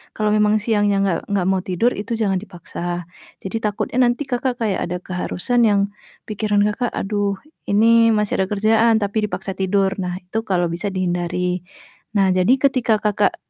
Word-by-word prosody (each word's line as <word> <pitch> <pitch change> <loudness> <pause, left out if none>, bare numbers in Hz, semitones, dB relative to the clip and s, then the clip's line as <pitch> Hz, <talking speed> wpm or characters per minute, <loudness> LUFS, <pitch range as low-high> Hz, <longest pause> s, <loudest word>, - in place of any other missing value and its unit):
Kalau 215 -1 0
memang 210 0 +3
siangnya 205 -2 +2
gak 170 - +1 0.2
gak 185 -3 +1
mau 190 -1 +1
tidur 205 +7 +2
itu 210 - -6
jangan 195 -3 +1
dipaksa, 175 -5 -10 0.6
jadi 190 - -5
takutnya 210 +3 -2
nanti 240 +4 0
Kakak 250 +1 0
kayak 210 -4 0
ada 180 +1 -3
keharusan 185 +6 -1
yang 205 -1 +3 0.5
pikiran 210 -1 0
Kakak, 235 +3 -2
"Aduh, 205 0 -1 0.3
ini 205 +2 +4 0.3
masih 210 -1 0
ada 190 - +1
kerjaan," 220 +2 +3
tapi 205 +2 -2
dipaksa 190 0 -5
tidur, 195 0 +2
nah 180 0 -3
itu 180 +5 -5
kalau 175 -2 +2
bisa 175 +5 -3
dihindari. 180 0 -1 0.5
Nah, 195 -1 +4
jadi 185 +7 +4
ketika 255 -5 +3
Kakak 210 -1 +2
205 Hz, 165 wpm, -20 LUFS, 185-215 Hz, 0.6 s, ini